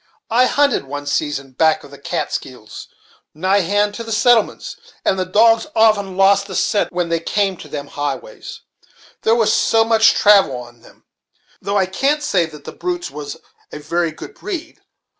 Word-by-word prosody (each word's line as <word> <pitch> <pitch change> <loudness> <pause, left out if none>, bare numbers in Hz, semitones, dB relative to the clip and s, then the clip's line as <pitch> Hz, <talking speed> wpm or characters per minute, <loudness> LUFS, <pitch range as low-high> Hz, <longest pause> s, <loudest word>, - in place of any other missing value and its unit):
I 250 +3 +4
hunted 285 - +1
one 145 +1 -6
season 145 -2 -2
back 160 +4 +2
of - - -14
the - - -13
Kaatskills, - - -5 0.5
nigh 190 +5 +2
hand 205 +3 +1
to 230 - -6
the 225 - -8
settlements, 225 0 +2 0.3
and 190 - +1
the 185 - -2
dogs 225 +6 +4
often 210 -4 +2
lost 195 +1 +4
the 190 - -7
scent, 205 -1 0
when 175 -1 -2
they 165 0 0
came 195 +3 -1
to - - -11
them 145 -1 -6
highways, 145 - -6 0.6
there 225 - +3
was 225 -2 +2
so 225 0 +3
much 225 -1 +4
travel 200 -9 +5
on 120 -1 -12
them; - - -20 0.6
though 200 +1 -1
I 190 - +3
can't 275 +11 0
say 180 - +1
that 150 -2 -13
the - - -8
brutes 350 -1 -4
was 145 -1 -7
of - - -21 0.3
a - - -5
very 165 +3 -2
good 275 - -11
breed. 350 -6 -7
200 Hz, 180 wpm, -18 LUFS, 160-225 Hz, 0.6 s, travel